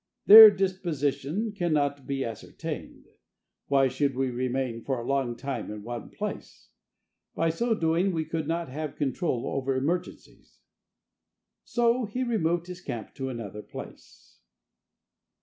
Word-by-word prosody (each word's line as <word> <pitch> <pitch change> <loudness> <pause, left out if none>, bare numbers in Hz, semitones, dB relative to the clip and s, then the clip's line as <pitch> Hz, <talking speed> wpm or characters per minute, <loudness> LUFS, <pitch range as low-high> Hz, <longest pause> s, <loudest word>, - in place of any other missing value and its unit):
"Their 220 +1 +12
disposition 185 - -2
cannot 150 -8 -1
be 135 -1 -2
ascertained. 115 -2 -7 0.6
Why 135 -1 +4
should 140 0 -1
we 130 0 0
remain 125 -1 -2
for 135 -2 -2
a 120 - -6
long 135 -3 0
time 135 -3 -5
in 105 -1 -7
one 120 +1 -6
place? - - -7 0.7
By 165 0 +1
so 230 +7 0
doing 170 +1 +1
we 160 -3 -2
could 160 -1 -3
not 165 +1 -2
have 150 +2 -5
control 135 -2 -1
over 135 0 -1
emergencies!" 170 +7 -4 1.1
So 240 0 +1
he 245 +5 -3
removed 175 -8 0
his 180 0 -9
camp 120 - -6
to 130 -1 -4
another 105 -4 -6
place. - - -12
145 Hz, 130 wpm, -27 LUFS, 130-175 Hz, 1.1 s, Their